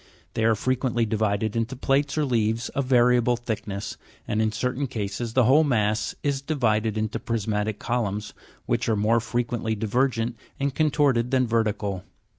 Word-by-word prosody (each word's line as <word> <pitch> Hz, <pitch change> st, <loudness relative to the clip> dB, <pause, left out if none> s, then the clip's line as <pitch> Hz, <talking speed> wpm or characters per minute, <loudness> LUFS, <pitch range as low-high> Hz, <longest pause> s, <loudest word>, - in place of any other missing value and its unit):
They 110 Hz, -, 0 dB
are 115 Hz, 0 st, +4 dB
frequently 125 Hz, 0 st, 0 dB
divided 110 Hz, 0 st, 0 dB
into 115 Hz, +3 st, -1 dB
plates 140 Hz, +3 st, 0 dB
or 150 Hz, -, +2 dB
leaves 115 Hz, -2 st, 0 dB
of 140 Hz, -, -2 dB
variable 125 Hz, -1 st, +4 dB
thickness, 105 Hz, -3 st, -4 dB, 0.3 s
and 105 Hz, -, 0 dB
in 110 Hz, 0 st, +1 dB
certain 125 Hz, +5 st, -1 dB
cases 110 Hz, -1 st, -4 dB
the 130 Hz, -, +4 dB
whole 135 Hz, +7 st, +5 dB
mass 110 Hz, -6 st, 0 dB
is 140 Hz, -2 st, 0 dB
divided 110 Hz, -7 st, 0 dB
into 110 Hz, 0 st, -2 dB
prismatic 105 Hz, -2 st, -1 dB
columns, 105 Hz, -4 st, -2 dB, 0.3 s
which -, -, 0 dB
are 110 Hz, -, +3 dB
more 110 Hz, +3 st, +3 dB
frequently 120 Hz, -1 st, -2 dB
divergent 115 Hz, +2 st, 0 dB, 0.2 s
and 140 Hz, -1 st, 0 dB
contorted 140 Hz, -5 st, +2 dB
than 130 Hz, -1 st, +2 dB
vertical. 105 Hz, -5 st, -1 dB
115 Hz, 155 wpm, -25 LUFS, 110-130 Hz, 0.3 s, whole